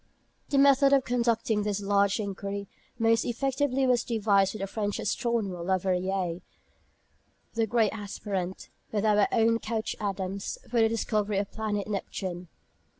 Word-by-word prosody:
The 280 - +1
method 275 0 +6
of 270 -2 +4
conducting 235 -3 +1
this 205 -1 -1
large 200 +1 +2
inquiry 200 0 -4 0.3
most 225 0 +3
effectively 270 +2 0
was 245 -2 +3
devised 200 -4 +2
by - - -3
the 195 - -3
French 205 +1 -2
astronomer, 210 -5 -1
Le 190 +2 +1
Verrier 185 -1 -1 1.1
the 225 -1 +1
great 225 -2 +2
aspirant, 200 -3 -4 0.2
with 210 0 0
our 210 -1 +4
own 230 0 +3
Couch 220 0 -3
Adams, 195 -1 -3
for 235 -1 +1
the 225 - +4
discovery 215 -2 0
of 200 0 -2
the - - -24
planet 210 -2 -2
Neptune. 185 -3 -4
210 Hz, 150 wpm, -28 LUFS, 195-230 Hz, 1.1 s, method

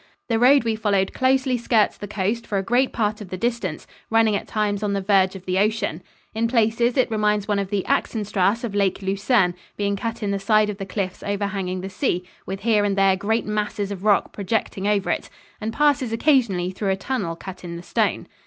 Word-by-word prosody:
The 225 -1 +2
road 265 +2 +6
we 225 -1 0
followed 200 -3 0
closely 260 -1 +2
skirts 225 -2 +2
the 205 - -8
coast 210 +3 -2
for 205 - -1
a 195 - 0
great 245 +6 +2
part 215 -1 -1
of 200 - -8
the 185 - -5
distance, 230 -7 -2 0.2
running 225 -2 +3
at - - -3
times 210 -2 -1
on 205 -1 -1
the 200 - 0
verge 195 -1 +2
of 190 -1 -10
the 185 0 0
ocean. 205 -5 0 0.3
In 225 +1 0
places 235 +1 +2
it 255 -2 +2
reminds 210 -1 +1
one 205 -1 +1
of 195 -1 -3
the 200 -2 -1
Axenstrasse 210 0 0
of 230 -4 -3
Lake 200 -1 0
Lucerne, 195 0 +2 0.2
being 200 0 0
cut 225 +2 -4
in 200 - 0
the 200 - -1
side 215 +1 +3
of 200 - -8
the 195 - -5
cliffs 190 -2 -3
overhanging 195 -2 -2
the 190 - -5
sea, 185 -3 -1 0.2
with 195 +1 -5
here 215 -1 +3
and 200 -1 0
there 195 -1 +4
great 220 +4 -1
masses 210 -1 -2
of 195 -1 -6
rock 210 -2 +3
projecting 200 -1 -2
over 205 -2 +1
it; - - -3 0.3
and 220 +1 -2
passes 285 -2 +2
occasionally 225 - +2
through 195 +1 -3
a 190 - +2
tunnel 195 -5 -3
cut 185 +2 -9
in 170 -1 -6
the 170 - -8
stone. - - 0
205 Hz, 220 wpm, -23 LUFS, 195-225 Hz, 0.3 s, road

